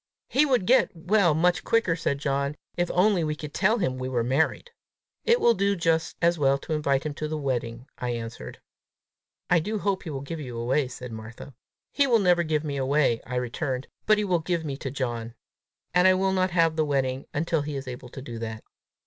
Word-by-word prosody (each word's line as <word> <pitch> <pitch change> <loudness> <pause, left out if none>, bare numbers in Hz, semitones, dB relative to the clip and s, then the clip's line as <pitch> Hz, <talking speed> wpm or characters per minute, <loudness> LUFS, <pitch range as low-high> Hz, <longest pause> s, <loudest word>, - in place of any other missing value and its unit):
"He 295 +3 +3
would 250 -8 +2
get 255 +5 +4
well 175 -1 +2
much 175 +3 +2
quicker," 225 -7 +2
said 140 -4 -1
John, 140 0 -1 0.2
"if 175 0 0
only 185 -1 +3
we 155 -1 -1
could 150 -1 -8
tell 210 +5 +3
him 130 - -1
we 130 0 -3
were 120 -3 0
married!" 145 - 0 0.5
"It 470 +1 +4
will 235 - +5
do 200 -1 +1
just 165 -2 0
as 170 -1 +3
well 140 -1 +3
to 155 - -5
invite 140 -2 +1
him 150 - -2
to 155 +1 -4
the 155 0 -3
wedding," 125 -4 -3
I 125 - -2
answered. 115 -1 -6 0.9
"I 180 - +4
do 215 +7 -2
hope 195 -1 -1
he 165 - -7
will 135 -3 -4
give 155 +4 -6
you 125 -5 -6
away," 125 +4 +1
said 125 -1 -8
Martha. 110 +4 -9 0.4
"He 280 -1 +2
will 240 -3 +5
never 180 -4 +3
give 155 -2 0
me 145 -2 -3
away," 135 -3 +2
I 125 - -4
returned; 125 +1 -2 0.2
"but 215 - +5
he 210 - +1
will 180 -4 +1
give 165 0 -2
me 140 -2 -3
to 135 - -5
John. 120 -3 -4 0.6
And 180 +1 +5
I 185 - +6
will 190 +1 +1
not 185 0 +2
have 165 -2 +2
the 155 - +3
wedding 135 -3 -1
until 160 +1 0
he 145 0 -4
is 135 -1 -5
able 125 0 -7
to 130 - -9
do 120 -4 -7
that." 110 -1 -5
150 Hz, 220 wpm, -26 LUFS, 130-180 Hz, 0.9 s, I